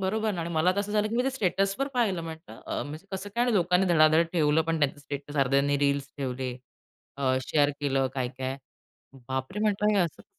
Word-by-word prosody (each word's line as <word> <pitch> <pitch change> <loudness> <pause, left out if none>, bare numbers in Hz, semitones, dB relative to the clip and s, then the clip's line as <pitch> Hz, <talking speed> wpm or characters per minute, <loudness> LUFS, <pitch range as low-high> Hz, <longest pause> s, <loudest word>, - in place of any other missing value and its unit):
बरोबर 215 +3 0
ना. 175 - -3
आणि 165 +1 -4
मला 165 +2 +3
तर 200 - 0
असं 205 +1 -4
झालं, 210 0 +2
की 225 - -2
मी 245 - +3
ते 270 - +1
स्टेटसवर 200 +2 0
पाहिलं 205 -8 +1
म्हटलं. 160 0 -9
अ, - - -2
म्हणजे 155 +6 -8
कसं 190 +1 -5
काय 240 +1 +2
आणि 245 -2 +1
लोकांनी 180 0 +3
धडाधड 160 -1 +5
ठेवलं 155 -2 +3
पण 165 0 -1
त्यांचं 145 0 +1
स्टेटस. 145 +1 -7
अर्ध्यांनी 140 +1 +2
रील्स 140 -1 +1
ठेवले, 130 -2 -3 0.6
अ, 130 -2 +1
शेअर 145 -1 +3
केलं 135 -2 +1
काय-काय, 130 0 -3 0.7
"बाप 130 +4 -3
रे!" 210 - -4
म्हटलं 210 0 +2
हे - - +4
असं 170 -4 -1
कसं. - - -36
165 Hz, 215 wpm, -27 LUFS, 140-195 Hz, 0.7 s, धडाधड